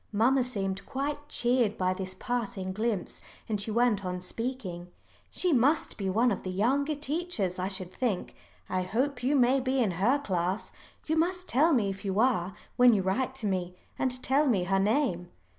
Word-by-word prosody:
Mamma 250 +5 +3
seemed 195 -5 -2
quite 290 +2 -3
cheered 240 -3 +1
by 185 0 +1
this 185 0 -6
passing 215 -6 -3
glimpse, 215 -2 -2 0.3
and 210 -2 -1
she 200 - -3
went 225 -2 +2
on 180 0 -3
speaking. 185 -3 -5 0.4
"She 360 -3 0
must 275 +5 +2
be 195 -2 -2
one 235 +6 +3
of 200 - -2
the 185 - -5
younger 270 +11 +1
teachers, 290 - -2
I 185 - -1
should 185 -2 -4
think. 230 -8 -2 0.3
I 185 - -1
hope 245 +8 -1
you 265 +4 +2
may 260 0 +4
be 260 +1 0
in 230 -7 +2
her 205 +11 +2
class. 190 -6 -2 0.3
You 320 +1 0
must 360 +3 0
tell 305 +7 +3
me 215 -9 +2
if 195 0 -9
you 195 0 -1
are 200 -7 +2 0.2
when 245 -2 +7
you 195 - +1
write 255 +8 0
to 260 -5 -5
me, 180 -2 -1 0.2
and 255 -1 -1
tell 285 +3 +3
me 205 -8 +2
her 195 +2 +1
name." 200 - +1
225 Hz, 190 wpm, -29 LUFS, 190-265 Hz, 0.4 s, when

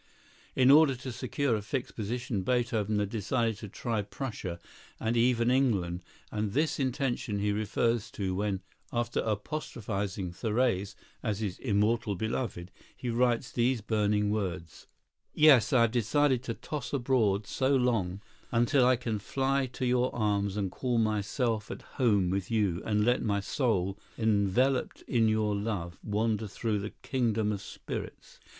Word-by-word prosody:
In 130 +1 +6
order 150 -2 +6
to 130 +1 -6
secure 135 +1 -1
a 105 - -2
fixed 125 +5 -4
position, 120 0 -2
Beethoven 110 -2 0
had 105 -1 0
decided 115 0 0
to 105 -2 -8
try 115 +2 -2
Prussia 105 -5 -5 0.4
and 115 +1 0
even 120 0 +3
England, 100 -10 +1 0.3
and 105 -2 -2
this 150 +3 +1
intention 130 -5 -1
he 105 +1 +1
refers 110 +2 0
to 95 -2 -2
when, 100 0 -1 0.3
after 120 0 -1
apostrophizing 105 - -3
Therese 105 -1 0 0.3
as 105 -4 -2
his 100 -5 -3
"immortal 105 -1 +1
beloved," 105 -3 -3 0.3
he 125 - -3
writes 120 0 +1
these 120 0 +1
burning 105 -1 +1
words: 90 -6 -4 0.5
"Yes, 150 -6 +6
I 130 -4 +5
have 115 -1 +3
decided 125 +3 +2
to 115 - -3
toss 145 -4 -6
abroad 120 -7 +2
so 135 +5 +1
long, 110 -7 +1 0.3
until 120 +3 +3
I 130 - +5
can 115 -3 -3
fly 135 +4 0
to 130 - -2
your 125 0 +2
arms 100 -3 0
and 100 -3 -1
call 125 +3 -1
myself 110 +1 0
at - - -7
home 105 -8 +1
with 95 -1 -2
you, 100 -5 +1
and 105 -1 +2
let 125 +1 +3
my 100 -2 0
soul, 100 -3 0 0.2
enveloped 110 +5 +1
in 115 -3 +2
your 110 -1 +1
love, 100 -5 -3
wander 110 0 0
through 105 +1 -2
the 105 +2 -5
kingdom 115 -5 0
of 100 -2 -3
spirits." 95 - -7
110 Hz, 150 wpm, -30 LUFS, 100-125 Hz, 0.5 s, In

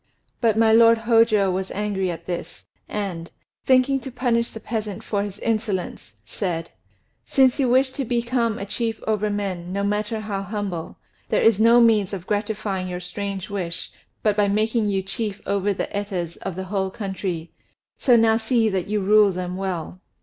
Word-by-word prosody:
But 225 -3 +2
my 225 -1 +5
lord 230 0 +7
Hôjô 225 -4 +4
was 190 +1 -2
angry 200 -2 -1
at 170 -1 -6
this, 175 -1 -6 0.2
and, 185 -5 -4 0.4
thinking 260 +1 +4
to 265 - -7
punish 240 -2 0
the 225 - -9
peasant 215 -3 -4
for 205 -2 -1
his 200 -1 -5
insolence, 205 - -3
said: 165 - -3 0.5
"Since 265 -1 +3
you 260 -3 +2
wish 260 +2 +3
to 275 - -3
become 235 -1 0
a 200 - -4
chief 225 +2 -2
over 215 -1 0
men, 190 -4 -3
no 200 +1 -1
matter 210 +2 -1
how 205 -2 -3
humble, 195 -4 -4 0.3
there - - +2
is 225 -3 +5
no 230 +2 +6
means 215 -4 +3
of 185 -3 -5
gratifying 205 -2 -2
your 180 0 -4
strange 195 +2 -5
wish 180 -4 -3 0.3
but 210 -2 +3
by 205 -1 +3
making 215 +2 +1
you 195 -1 0
chief 205 +1 -4
over 200 0 0
the 195 - -2
Etas 185 -5 -3
of 190 -3 -5
the 190 - -4
whole 190 -1 0
country. 190 -4 -4 0.5
So 245 - +5
now 225 -1 +4
see 230 -1 +2
that 190 -3 -2
you 210 0 0
rule 210 +1 +5
them 180 0 -4
well." 185 -2 -4
205 Hz, 180 wpm, -23 LUFS, 190-225 Hz, 0.5 s, lord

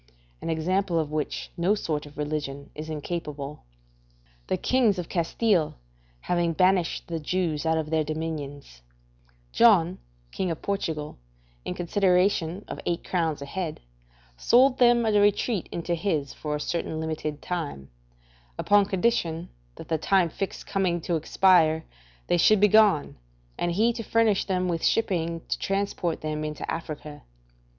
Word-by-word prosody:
An - - -4
example 175 +3 0
of 155 -2 -1
which 155 -1 -3
no 180 +4 +2
sort 150 -7 -3
of 145 - -16
religion 145 -2 -4
is 155 +1 -7
incapable. 150 -2 -5 0.8
The - - 0
kings 240 -6 +2
of 175 -2 -5
Castile 175 -1 +1 0.5
having 175 -1 0
banished 185 0 +2
the 165 -1 -4
Jews 160 -1 -1
out 160 0 +2
of 155 -1 -3
their 160 -1 +2
dominions, 145 - -5 0.7
John, 185 -6 +4 0.3
King 185 - -2
of 165 - -3
Portugal, 160 - -3 0.5
in - - -3
consideration 180 0 +1
of - - -6
eight 170 0 -2
crowns 160 -5 -1
a - - -6
head, 165 +1 -4 0.6
sold 255 - +4
them 240 -1 +5
a 220 - +2
retreat 205 0 +2
into 170 0 -2
his 160 -5 -1
for 150 -1 -4
a - - -3
certain 160 0 -3
limited 155 -2 -3
time, 150 - -5 0.7
upon 205 -1 +4
condition 180 -5 0 0.3
that - - -11
the 160 -1 0
time 185 0 +3
fixed 195 - -5
coming 185 -3 0
to 170 - -1
expire 160 -1 +3 0.4
they - - +2
should 215 +4 +5
begone, 205 -6 +4 0.4
and 175 0 -1
he 225 +6 +3
to 230 - -5
furnish 225 -2 +2
them 185 -2 0
with 170 -2 -2
shipping 170 -6 +1
to - - -2
transport 195 -4 -1
them 155 0 -3
into 150 -1 -5
Africa. 155 -2 -6
170 Hz, 145 wpm, -26 LUFS, 155-195 Hz, 0.8 s, them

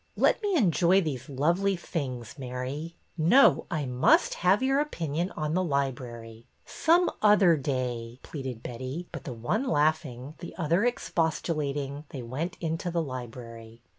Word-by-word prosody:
Let - - +3
me 410 -3 0
enjoy 185 - +4
these 135 -6 -4
lovely 170 +8 +1
things, 130 -9 -5
Mary." 130 +6 -5 0.2
No, 210 - +5
I 155 -6 -1
must 125 0 +3
have 190 +7 +2
your 270 +1 +3
opinion 170 - -2
on 155 -1 -1
the 185 +2 +2
library." 120 -6 -3
'' - - -40
Some 340 +2 +3
other 205 -5 +6
day," 125 -4 -3
pleaded 130 -6 -6
Betty; 130 +8 -5
but - - -8
the 140 - -4
one 120 - -1
laughing, 150 - 0
the 175 - -8
other 170 +3 +1
expostulating, 150 - -1
they 130 -4 -6
went 145 +9 -4
into 165 +1 -2
the 170 0 -1
library. 120 -3 -8
150 Hz, 145 wpm, -28 LUFS, 125-175 Hz, 0.2 s, other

